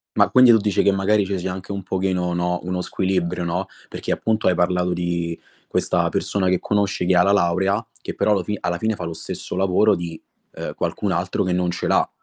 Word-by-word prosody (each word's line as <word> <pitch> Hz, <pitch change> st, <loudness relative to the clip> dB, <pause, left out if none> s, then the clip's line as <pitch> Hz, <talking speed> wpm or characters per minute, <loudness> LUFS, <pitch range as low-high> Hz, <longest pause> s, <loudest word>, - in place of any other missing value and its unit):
Ma -, -, +4 dB
quindi 130 Hz, -1 st, +7 dB
tu 115 Hz, -, +7 dB
dici 105 Hz, -2 st, +1 dB
che 100 Hz, -, +4 dB
magari 100 Hz, +1 st, +2 dB
ce 95 Hz, 0 st, -2 dB
sia 90 Hz, +1 st, -3 dB
anche 95 Hz, +1 st, -7 dB
un 100 Hz, -1 st, -4 dB
pochino, 90 Hz, -2 st, -1 dB
no, 90 Hz, 0 st, 0 dB
uno 90 Hz, 0 st, -2 dB
squilibrio, 90 Hz, -1 st, -1 dB
no, 90 Hz, +2 st, -2 dB, 0.2 s
perché -, -, -5 dB
appunto 110 Hz, -1 st, 0 dB
hai 90 Hz, -, +4 dB
parlato 90 Hz, +1 st, +1 dB
di 85 Hz, -1 st, -2 dB, 0.3 s
questa -, -, +1 dB
persona 95 Hz, -2 st, -1 dB
che 90 Hz, -1 st, +2 dB
conosci 100 Hz, -3 st, 0 dB
che 90 Hz, +1 st, +3 dB
ha 90 Hz, -, +6 dB
la 100 Hz, -, +3 dB
laurea 95 Hz, +3 st, +1 dB, 0.2 s
che -, -, -6 dB
però -, -, +1 dB
allo 100 Hz, -2 st, +3 dB
fi 105 Hz, +3 st, -3 dB
alla 85 Hz, 0 st, -1 dB
fine 110 Hz, +4 st, -1 dB
fa 90 Hz, -, -7 dB
lo 85 Hz, -, -4 dB
stesso 80 Hz, -, -6 dB
lavoro 95 Hz, +3 st, +3 dB
di, 85 Hz, -2 st, -6 dB, 0.3 s
eh, -, -, -5 dB
qualcun -, -, -2 dB
altro -, -, -1 dB
che 90 Hz, -, -1 dB
non 90 Hz, 0 st, 0 dB
ce 85 Hz, -, -3 dB
l'ha. -, -, +2 dB
90 Hz, 225 wpm, -22 LUFS, 90-100 Hz, 0.3 s, quindi